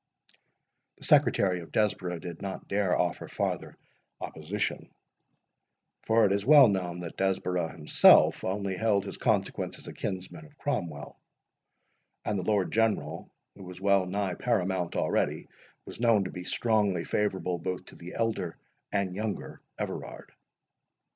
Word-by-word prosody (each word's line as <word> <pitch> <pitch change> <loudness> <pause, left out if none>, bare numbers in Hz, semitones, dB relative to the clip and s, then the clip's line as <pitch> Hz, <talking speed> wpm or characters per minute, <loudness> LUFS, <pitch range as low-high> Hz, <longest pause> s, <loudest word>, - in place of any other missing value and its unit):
The - - -13
secretary 90 -2 +4
of 80 -3 -11
Desborough 95 -4 0
did 85 0 -8
not 95 -1 -6
dare 100 -2 +1
offer 85 -3 -1
farther - - -3 0.4
opposition; 90 +7 -4 1.1
for 110 0 +3
it 100 - +2
is 100 0 +1
well 145 0 +8
known 90 -3 -2
that 85 - -7
Desborough 90 -3 0
himself 75 -2 +5
only 100 0 -2
held 105 -2 +2
his - - -6
consequence - - 0
as - - -13
a - - -8
kinsman 95 - -5
of 150 -1 -24
Cromwell; 85 - -4 1.1
and 105 -2 0
the - - -3
Lord 100 -1 +1
General, 115 -1 0 0.2
who 95 - -12
was 90 0 -9
well 100 -1 +3
nigh 95 0 -1
paramount 95 -6 -1
already, - - 0 0.4
was - - -10
known 115 -4 +4
to 90 - -5
be 90 0 -7
strongly 105 -5 +1
favourable 95 -4 -1
both 90 +1 -4
to - - -14
the 85 +1 -10
elder 110 -7 -1 0.3
and 100 -3 0
younger 105 +2 -4 0.2
Everard. - - -6
95 Hz, 140 wpm, -29 LUFS, 90-105 Hz, 1.1 s, well